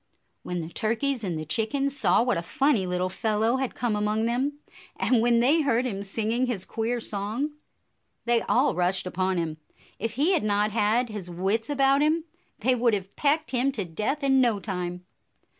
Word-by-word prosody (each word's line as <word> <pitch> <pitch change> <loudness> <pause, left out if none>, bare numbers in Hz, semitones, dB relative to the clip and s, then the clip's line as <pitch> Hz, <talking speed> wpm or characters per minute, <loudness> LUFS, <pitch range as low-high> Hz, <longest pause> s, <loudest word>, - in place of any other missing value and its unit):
When 180 -1 -4
the 160 - -6
turkeys 230 +6 -1
and 175 -5 -2
the 155 - -5
chickens 270 - 0
saw 260 - +3
what 245 -8 +1
a - - -3
funny 230 - +1
little 180 0 0
fellow 220 +5 0
had 265 -2 -3
come 235 -4 -1
among 210 +1 0
them, 255 +5 0 0.4
and 245 -3 +2
when 235 0 +3
they 295 +7 +4
heard 255 -4 +1
him 200 -6 -3
singing 225 +5 -1
his 205 -7 -2
queer 230 +2 -2
song, 220 +7 -3 0.7
they 235 -1 +3
all 260 +4 +2
rushed 180 +1 0
upon 185 +1 -1
him. 160 -2 -2 0.4
If 225 +1 -3
he 290 +9 +2
had 350 - +2
not 210 0 +1
had 225 +3 +1
his 205 -5 -6
wits 195 +7 -1
about 275 0 +3
him, 310 +2 +2 0.3
they 255 +4 +2
would 235 -2 +2
have 195 -1 -6
pecked 300 +2 +1
him 260 +2 +2
to 205 -7 -3
death 215 - -3
in 270 -1 +4
no 235 -5 +2
time. 180 -3 -4
225 Hz, 190 wpm, -26 LUFS, 195-260 Hz, 0.7 s, they